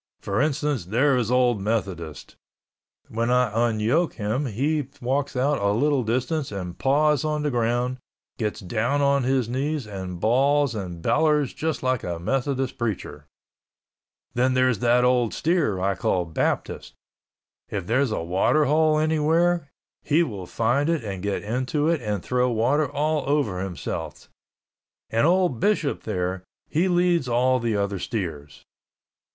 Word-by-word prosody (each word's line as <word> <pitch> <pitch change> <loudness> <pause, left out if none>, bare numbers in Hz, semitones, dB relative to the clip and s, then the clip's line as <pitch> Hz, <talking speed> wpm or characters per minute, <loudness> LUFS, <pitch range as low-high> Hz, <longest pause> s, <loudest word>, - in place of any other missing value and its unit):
For 100 +5 -1
instance, 145 - 0
there 130 +9 +2
is 120 -3 0
old 125 -4 +2
Methodist—when 100 - -5
I 125 -2 +3 0.2
unyoke 115 +10 +1
him 115 +6 -2
he 140 +5 -1
walks 135 +3 -1
out 135 +1 +1
a 100 - +2
little 140 +4 +2
distance 130 +6 -1
and 90 -3 -5
paws 145 +1 +2
on 150 -1 -1
the 150 - 0
ground, 120 +1 0 0.4
gets 105 -2 -2
down 120 +9 0
on 140 0 +3
his 130 -2 +1
knees 140 +3 -2
and 95 -4 -6
balls 135 +5 +2
and 90 -6 -6
bellers 150 -3 +2
just 160 -2 -3
like 130 -2 0
a 85 -1 -3
Methodist 135 +7 -2
preacher. 110 -5 -4 1.1
Then 130 +1 +2
there 130 0 +4
is 115 -6 -1
that 120 +2 +3
old 125 -2 +2
steer 155 - +1
I 95 +1 +1
call 90 -1 0
Baptist. 80 - -2 0.7
If - - -4
there's 130 +6 +1
a 105 - -2
water 95 - +2
hole 155 +2 +3
anywhere, 160 +1 +2 0.3
he 155 +3 +2
will 100 - -6
find 125 - +1
it 165 -7 0
and 100 -4 -5
get 100 +1 -2
into 130 +7 -1
it 165 -4 +1
and 105 -4 -3
throw 125 0 +1
water 125 +6 +1
all 150 +1 0
over 140 -11 +1
himself—and 95 - -5
old 175 -8 +2
Bishop 200 - +1
there, 95 -3 -2 0.3
he 165 +5 +1
leads 175 -5 +2
all 125 +2 +2
the 115 -3 -1
other 100 -1 -1
steers." 80 - -5
125 Hz, 145 wpm, -24 LUFS, 105-145 Hz, 1.1 s, there